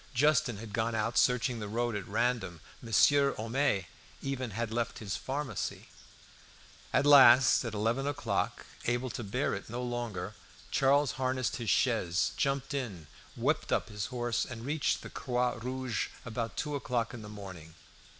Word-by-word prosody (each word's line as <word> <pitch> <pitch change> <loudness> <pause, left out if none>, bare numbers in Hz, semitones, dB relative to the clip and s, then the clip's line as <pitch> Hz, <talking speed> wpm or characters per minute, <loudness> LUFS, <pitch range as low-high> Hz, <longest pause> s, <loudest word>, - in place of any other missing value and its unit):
Justin 135 -4 +3
had 105 0 -9
gone 115 +1 0
out 110 +2 -1
searching 125 -1 +2
the 105 - -4
road 120 +2 -1
at 105 - -4
random. 110 -5 0 0.2
Monsieur 140 +6 +4
Homais 115 -3 0 0.4
even 130 -3 -2
had 115 +2 -3
left 120 0 -1
his 100 -3 -4
pharmacy. 140 +1 -4 1.0
At 140 - +3
last, 130 -4 +8
at 115 -3 -4
eleven 115 +6 0
o'clock, 100 -10 -2 0.2
able 120 +1 0
to 120 - -5
bear 100 - -1
it 100 - -6
no 120 +2 -4
longer, 120 -6 -3 0.4
Charles 140 0 +3
harnessed 130 -1 0
his 115 -3 -3
chaise, 100 -9 +2
jumped 135 0 -1
in, 110 - -4 0.3
whipped - - 0
up - - +1
his 105 -1 -4
horse, 120 -1 -1
and 115 -1 -7
reached 145 +1 0
the - - -7
"Croix 125 -1 0
Rouge" 125 -1 -2 0.2
about 115 -1 -4
two 150 -2 -2
o'clock 125 -4 -1
in 120 - -7
the 105 - -9
morning. 95 -6 -9
120 Hz, 160 wpm, -31 LUFS, 110-130 Hz, 1.0 s, last